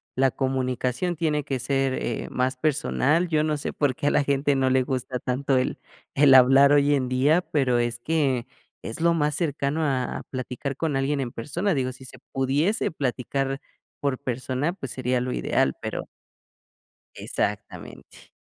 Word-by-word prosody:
la 135 +1 +3
comunicación 130 +5 -1
tiene 150 -3 -1
que 135 - -2
ser, 135 +1 0
eh, - - -3
más 130 +1 0
personal, 155 +3 +1
yo 155 -1 +2
no 155 -1 0
sé, 145 - -4
por 145 -3 0
qué, 160 -3 -2
a - - +4
la 140 - +2
gente 140 0 +1
no 130 -1 +2
le 130 0 +3
gusta 130 0 -3
tanto, 130 +2 0
el 130 - -1 0.4
el 140 -1 +6
hablar 135 +2 +7
hoy 145 0 +4
en 130 -2 0
día, 135 +6 +3
pero, 130 -8 +1
es 120 0 -1
que 135 -4 0 0.4
es 115 - -6
lo 170 +1 +3
más 150 -3 0
cercano 150 -1 -1
a 135 -4 -1
a - - -8
platicar 130 +1 -5
con 150 -1 -1
alguien 140 +1 0
en 125 -3 -4
persona. 170 - -2
Digo, 130 -3 -1
si 130 - -13
se 130 0 -11 0.2
pudiese 140 +10 +1
platicar 135 -1 -2 0.4
por 140 -3 0
persona, 130 +4 -2
pues, 135 -10 -7
sería 125 -1 -1
lo 125 0 -2
ideal, 65 - +1
pero. - - -4 1.1
Exactamente. - - -5
135 Hz, 175 wpm, -25 LUFS, 130-150 Hz, 1.1 s, hablar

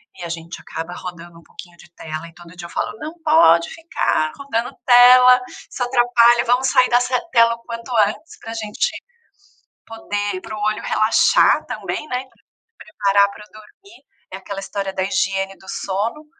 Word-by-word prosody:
e 180 - -10
a 170 - -6
gente 165 0 -7
acaba 165 +2 -7
rodando 175 -2 -10
um - - -20
pouquinho 175 +1 -14
de 175 - -18
tela, 155 +1 -7
e 165 - -17
todo 175 -1 -15
dia 175 -1 -9
eu - - -18
falo: 210 +4 -4
"Não 310 +1 -7
pode 170 - +4
ficar 320 - -2
rodando 245 -4 -3
tela, 250 +1 +7 0.3
isso 245 - -4
atrapalha, 240 -1 +3
vamos 250 +2 +2
sair 250 - +4
dessa 245 +1 +2
tela 230 -1 +4
o - - -19
quanto 230 +1 -8 0.2
antes 220 +10 -9
pra 225 - -8
gente 215 -2 -2 0.9
poder 205 -3 -4
para 215 - -8
o - - -8
olho 215 +1 -1
relaxar 215 +1 +3
também 300 - -5
né, 250 -2 -3
e 260 - -15
pra - - -32 0.3
preparar 200 -8 +1
pra 210 - -13
dormir". 315 - -18 0.3
É - - -5
aquela 195 +1 -7
história 195 0 -5
da 190 - -2
higiene 195 0 -1
do 190 - -19
sono, 215 +10 -4
215 Hz, 180 wpm, -19 LUFS, 185-245 Hz, 0.9 s, tela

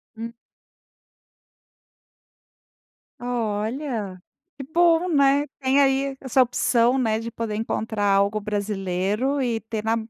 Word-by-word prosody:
Hum. 230 +1 -6 2.9
Olha, 225 -3 -3 0.4
que 275 - -6
bom, 335 +4 +3
né. 280 -2 +3
Tem 265 +1 +2
aí 270 0 +2
essa 265 0 +2
opção, 245 0 +2
né, 220 -4 +1
de 230 +1 -6
poder 225 -2 -4
encontrar 220 -1 -2
algo 200 +1 +2
brasileiro 205 +5 -1
e 235 -3 0
ter 220 -1 -5
na 225 +1 +1
230 Hz, 105 wpm, -23 LUFS, 210-270 Hz, 2.9 s, bom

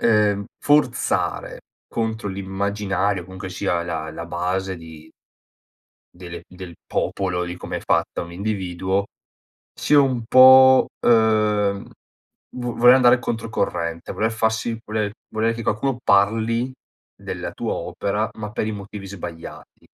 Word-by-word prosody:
ehm, 105 -2 +3 0.2
forzare 145 -4 +1 0.3
contro 110 -2 -3
l'immaginario, 100 0 -2
comunque 95 +1 -8
sia 90 -2 -1
la 80 -2 -4
la 85 +2 -7
base 90 +2 -2
di 80 -1 -13 1.0
delle 85 -1 -9
del 90 -2 -10
popolo, 90 -2 -1
di 90 0 -6
come - - -5
è - - -8
fatta - - 0
un 85 0 -8
individuo 95 0 -2 0.7
sia 145 -1 +4
un 130 -4 0
po', 130 +1 +8
ehm, 105 -3 +2 0.7
vo 120 -1 -3
voler 125 +2 +7
andare 125 -1 +5
controcorrente, 90 -8 -3
voler 110 +1 0
farsi 110 +1 -1
voler 105 -1 -2 0.2
volere 110 +1 0
che 115 0 -6
qualcuno 120 +5 -1
parli 115 +5 +2 0.4
della - - -6
tua - - -3
opera 105 +2 -2
ma 105 -1 -6
per 110 - -2
i - - -2
motivi 100 -1 -8
sbagliati. 85 -4 -9
105 Hz, 125 wpm, -22 LUFS, 90-115 Hz, 1.0 s, po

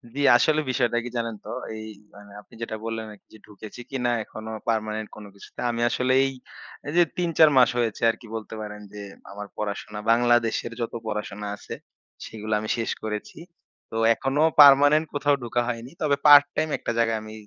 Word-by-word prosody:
জি, - - -4 0.2
আসলে 155 +5 +2
বিষয়টা 120 -2 0
কি 125 - -6
জানেন 115 -1 -3
তো? - - -8 0.3
এই 110 0 -8 0.5
আপনি 105 - -19
মানে 115 - -15
যেটা 115 -1 -4
বললেন 115 -1 -4
এক - - -26
জি, - - -14
ঢুকেছি 105 +3 -11
কিনা 125 -3 -1
এখনো 110 +1 -9 0.2
পার্মানেন্ট 110 -1 -2
কোন 105 - -11
কিছুতে। 100 - -15
আমি 115 - -3
আসলে 130 +2 0
এই 135 - -1 0.7
যে 175 - +7
৩-৪ 165 -3 +4
মাস 125 -2 +6
হয়েছে 115 -3 -1
আরকি 115 +1 -5
বলতে 110 0 -7
পারেন, 105 0 -8
যে 105 - -8 0.3
আমার 105 +1 -8
পড়াশোনা 105 0 -5
বাংলাদেশের 120 -1 +2
যত 115 - -3
পড়াশোনা 105 -1 -5
আছে - - -10 0.5
সেগুলা 110 0 -5
আমি 110 0 -6
শেষ 115 - -2
করেছি। 105 -1 -5 0.5
তো - - -7 0.2
এখনো 135 +4 -1 0.2
পার্মানেন্ট 145 +2 +7
কোথাও 145 0 +2
ঢোকা 120 +1 -1
হয়নি। 120 +1 -5
তবে 145 -3 +2
পার্টটাইম 145 +1 +6
একটা - - -4
জায়গায় 115 -1 +1
আমি 110 0 -10
115 Hz, 175 wpm, -24 LUFS, 110-130 Hz, 0.7 s, যে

